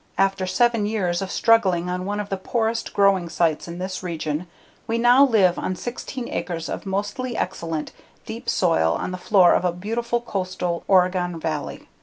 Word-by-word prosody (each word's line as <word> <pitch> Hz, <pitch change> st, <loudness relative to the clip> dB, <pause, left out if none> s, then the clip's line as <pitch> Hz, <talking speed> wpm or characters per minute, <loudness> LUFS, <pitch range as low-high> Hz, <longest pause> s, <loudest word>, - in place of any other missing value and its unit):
After 195 Hz, -1 st, +1 dB
seven 230 Hz, +2 st, +2 dB
years 185 Hz, -5 st, -1 dB
of 195 Hz, -, -4 dB
struggling 190 Hz, -7 st, +3 dB
on 180 Hz, 0 st, -3 dB
one 205 Hz, +1 st, -2 dB
of 205 Hz, -1 st, -4 dB
the 195 Hz, -, -1 dB
poorest 225 Hz, +3 st, -1 dB
growing 195 Hz, -4 st, +3 dB
sites 165 Hz, -2 st, 0 dB
in 170 Hz, 0 st, -7 dB
this 185 Hz, +1 st, -4 dB
region 165 Hz, -2 st, -3 dB, 0.4 s
we 230 Hz, 0 st, 0 dB
now 245 Hz, +3 st, +6 dB
live 205 Hz, -9 st, +3 dB
on 185 Hz, -, -2 dB
16 240 Hz, +4 st, -6 dB
acres 165 Hz, -3 st, -4 dB
of -, -, -5 dB
mostly 205 Hz, +6 st, -3 dB
excellent, 165 Hz, -4 st, -3 dB, 0.3 s
deep -, -, -6 dB
soil, 80 Hz, 0 st, +2 dB
on -, -, -3 dB
the 185 Hz, -, -4 dB
floor 185 Hz, -2 st, +5 dB
of -, -, +2 dB
a 180 Hz, -, +2 dB
beautiful, 230 Hz, +7 st, -2 dB
coastal 185 Hz, -6 st, -3 dB
Oregon 180 Hz, -2 st, +2 dB
valley. 155 Hz, -3 st, -4 dB
185 Hz, 175 wpm, -23 LUFS, 175-220 Hz, 0.4 s, now